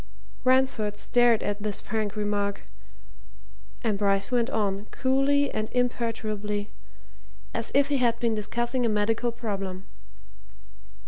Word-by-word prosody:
Ransford 255 -5 +2
stared 240 -1 +3
at 205 0 -2
this 210 -1 -1
frank 215 -1 -2
remark, 205 -1 -1 1.2
and 215 -4 0
Bryce 200 0 +1
went 240 -1 +2
on, 205 -4 -1
coolly 275 +2 +2
and 215 0 -2
imperturbably, 215 -4 -1 0.8
as - - -2
if 280 0 +4
he 285 - +2
had 240 -3 +2
been 230 -2 +1
discussing 240 +4 -1
a 235 - +2
medical 225 +3 +1
problem. 195 -5 -4
220 Hz, 120 wpm, -27 LUFS, 205-245 Hz, 1.2 s, if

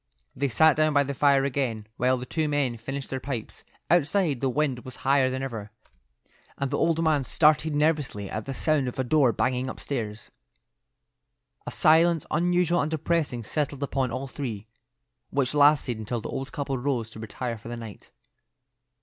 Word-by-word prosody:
They 140 - 0
sat 155 +5 +4
down 155 0 +2
by 145 0 +4
the 140 0 -4
fire 140 0 +3
again 125 -6 -1
while 130 +1 +2
the 125 - -6
two 155 +3 -1
men 140 -5 0
finished 135 +4 -6
their 130 - -2
pipes. 125 -4 -6 0.2
Outside, 165 -3 +2
the 135 - +1
wind 135 -1 0
was 130 - -9
higher 135 -1 +4
than 130 +1 -3
ever, 115 -6 -5 0.9
and 140 -1 -2
the 145 - 0
old 165 0 +1
man 155 -4 +2
started 150 +4 +3
nervously 150 -9 0
at 110 +2 -5
the 135 - -4
sound 150 -3 +1
of 125 - -5
a 130 - +1
door 135 -1 +3
banging 130 +2 -1
upstairs. 115 -6 -5 1.4
A - - -1
silence 165 0 +4
unusual 175 +1 +2
and 145 - -1
depressing 155 -6 -1
settled 145 +3 -2
upon 135 -2 -1
all 130 +3 -3
three, 120 -7 -5 0.6
which 135 -1 0
lasted 145 -5 +4
until 115 +2 -3
the 110 - -7
old 135 +1 -4
couple 140 -4 -3
rose 120 -4 -2
to 110 - -10
retire 115 +1 -5
for 105 - -12
the 120 0 -5
night. 115 -3 -10
135 Hz, 175 wpm, -26 LUFS, 125-150 Hz, 1.4 s, sat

